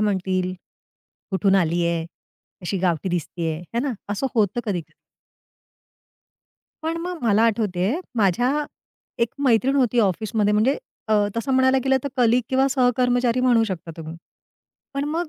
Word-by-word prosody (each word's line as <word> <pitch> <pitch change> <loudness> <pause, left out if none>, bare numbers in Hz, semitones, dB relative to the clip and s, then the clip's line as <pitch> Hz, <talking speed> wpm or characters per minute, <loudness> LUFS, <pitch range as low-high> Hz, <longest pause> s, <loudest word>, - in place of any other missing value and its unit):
म्हणतील? 190 -3 0 0.8
कुठून 195 0 +2
आली 170 -1 +1
आहे, 170 -1 -1 0.6
अशी 190 +2 -2
गावठी 175 -1 0
दिसतीये, 170 -2 -2 0.2
हे 235 - +1
ना, 270 0 -1 0.2
असं 205 +6 -1
होतं 215 +1 +1
कधी-कधी. 175 -8 -4 1.9
पण 325 +1 -1
मग 355 -1 -4
मला 220 -2 +3
आठवतेय, 205 -2 +1 0.2
माझ्या 245 - +2 0.6
एक 235 - +3 0.2
मैत्रीण 260 +2 +3
होती 245 -3 +2
ऑफिसमध्ये 210 +1 +1
म्हणजे 220 +6 +3 0.3
अ, 220 - +2 0.2
तसं 250 +4 -1
म्हणायला 260 0 +4
गेलं 265 0 +3
तर - - -1
कलीग 245 0 +4
किंवा 265 +1 +3
सहकर्मचारी 245 -1 +2
म्हणू 245 -3 +4
शकता 180 -5 -5
तुम्ही. 160 0 -8 0.8
पण 275 +1 -1
मग 330 +2 -2
225 Hz, 135 wpm, -23 LUFS, 185-255 Hz, 1.9 s, म्हणायला